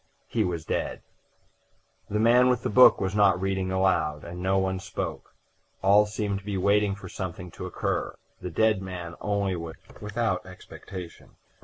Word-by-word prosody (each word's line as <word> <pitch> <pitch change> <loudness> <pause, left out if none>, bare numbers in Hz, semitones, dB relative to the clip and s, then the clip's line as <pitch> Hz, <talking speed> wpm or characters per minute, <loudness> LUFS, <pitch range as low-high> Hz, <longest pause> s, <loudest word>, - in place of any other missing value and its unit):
He - - 0
was 85 -3 -3
dead. - - -3 1.1
The 105 - 0
man 120 +3 +5
with 125 -2 +1
the - - -1
book 125 +5 +7
was 95 0 -1
not 100 -3 +4
reading 95 -1 -1
aloud, 95 -6 +1
and 90 +1 -7
no 95 +1 +2
one 95 -1 0
spoke; - - -6 0.5
all 105 +2 +5
seemed 105 -2 -2
to - - -17
be 100 -1 -3
waiting 100 +1 +2
for 100 -2 -10
something 90 -1 -6
to - - -7
occur; - - -2 0.3
the 90 - -4
dead 110 +3 +2
man 90 -3 -6
only 100 -2 0
was 85 -1 -6 0.3
without 105 -2 -1
expectation. 95 -1 -10
95 Hz, 165 wpm, -27 LUFS, 90-105 Hz, 1.1 s, book